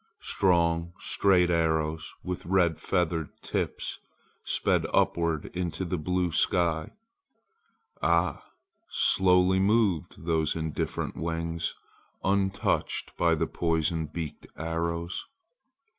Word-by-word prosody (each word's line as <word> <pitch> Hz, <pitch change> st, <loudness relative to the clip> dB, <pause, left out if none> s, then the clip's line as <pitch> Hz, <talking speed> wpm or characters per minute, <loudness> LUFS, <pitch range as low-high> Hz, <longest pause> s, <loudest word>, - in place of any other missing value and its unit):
Strong 85 Hz, -2 st, +2 dB
straight 90 Hz, -3 st, +3 dB
arrows 80 Hz, -1 st, 0 dB
with 90 Hz, -2 st, -5 dB
red 90 Hz, -3 st, +2 dB
feathered 85 Hz, -4 st, 0 dB
tips -, -, -3 dB, 0.4 s
sped -, -, +1 dB
upward 85 Hz, -3 st, +1 dB, 0.2 s
to 95 Hz, +4 st, -3 dB
the 90 Hz, -, -2 dB
blue 90 Hz, +2 st, 0 dB
sky. 80 Hz, -1 st, +2 dB, 1.1 s
Ah! 85 Hz, +2 st, +2 dB, 0.5 s
slowly 90 Hz, 0 st, +4 dB
moved 100 Hz, -, +1 dB
those 80 Hz, -2 st, +1 dB
indifferent 80 Hz, -2 st, -3 dB
wings, 85 Hz, 0 st, -2 dB, 0.5 s
untouched 100 Hz, 0 st, 0 dB
by -, -, +3 dB
the -, -, 0 dB
poison 80 Hz, -1 st, 0 dB
beaked 80 Hz, -1 st, -6 dB
arrows. 85 Hz, +2 st, -3 dB
85 Hz, 95 wpm, -28 LUFS, 80-90 Hz, 1.1 s, slowly